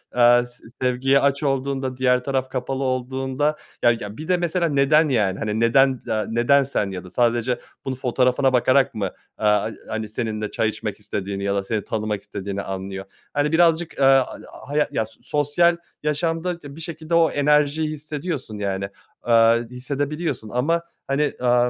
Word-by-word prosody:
eee, 120 0 +6
se 120 - -16 0.2
sevgiye 130 +2 +3
aç 140 +1 +1
olduğunda, 135 -2 -1
diğer 125 -1 +2
taraf 130 -1 -1
kapalı 130 +1 -3
olduğunda 130 +3 -1 0.3
ya 120 - +7
ya 105 0 -7
bir 155 - -7
de 180 -1 +3
mesela 170 -1 0
neden, 145 +2 +4
yani, 105 -7 +1
hani, 110 +1 -2
neden, 130 +2 +4
aaa, 110 -1 0
neden 120 +5 +4
sen? 105 -7 -2
Ya 90 -1 -6
da 90 - -11
sadece 120 +1 +1 0.3
bunu 130 -1 -2
fotoğrafına 130 +1 +2
bakarak 130 +2 +3
mı, 105 - -1
eee, 95 - -3 0.3
ha 105 +1 +3 0.2
hani 110 -1 -3
seninle 110 -2 -3
çay 110 - +1
içmek - - -5
istediğini 100 0 -4
ya 100 0 0
da 100 - 0
seni 105 0 -2
tanımak 105 -2 -2
istediğini 100 0 -5
anlıyor. 95 0 -5 0.3
Hani, 145 +1 +1
birazcık, 165 -1 +2
aaa, 135 - +4 0.2
a - - -10
ağa - - -13
haya 150 +1 +2
ya 110 - 0
s 110 - -19
sosyal 150 +4 +2 0.3
yaşamda 165 +3 -1
t 140 -2 -11
bir 165 - -9
şekilde 160 0 -3
o 165 -2 +4
enerjiyi 150 +1 +2
hissediyorsun, 150 - -5
yani, 100 -1 -2 0.3
aaa, 115 -1 +5
hissedebiliyorsun 140 0 -3
ama, 150 +9 +1 0.3
hani, 145 +2 +1
aaa, 125 0 +3
130 Hz, 175 wpm, -22 LUFS, 110-145 Hz, 0.3 s, ya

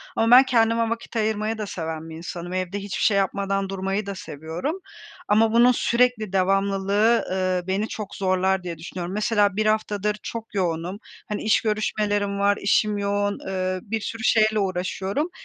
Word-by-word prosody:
ama 225 +1 +2
ben 260 - +9
kendime 230 -2 +2
vakit 230 +1 -5
ayırmayı 220 0 0
da 215 - -3
seven 160 -2 -5
bir 160 - -8
insanım. 175 +1 -6
Evde 185 +2 -2
hiçbir 200 0 -4
şey 205 - +4
yapmadan 195 0 0
durmayı 195 +2 -2
da 200 0 -5
seviyorum 170 - -5 0.5
ama 220 +2 +3
bunun 240 +2 +6
sürekli 235 -4 +1
devamlılığı, 195 +3 +2
ııı, 185 -1 -1
beni 195 +3 0
çok 210 -2 -7
zorlar 190 0 +1
diye 170 -2 -5
düşünüyorum. 175 +2 -6
Mesela 210 -1 +2
1 215 +1 0
haftadır 210 -1 0
çok 225 -2 -7
yoğunum, 180 +1 -2 0.3
hani, 210 - -3
iş 215 - +3
görüşmelerim 205 -2 -1
var, 200 0 +3
işim 210 +1 +2
yoğun, 205 0 -1
eee, 185 -1 -2
bir 220 +1 -3
sürü 225 +1 -5
şeyle 215 -1 +3
uğraşıyorum. 195 - -2
200 Hz, 165 wpm, -24 LUFS, 185-215 Hz, 0.5 s, ben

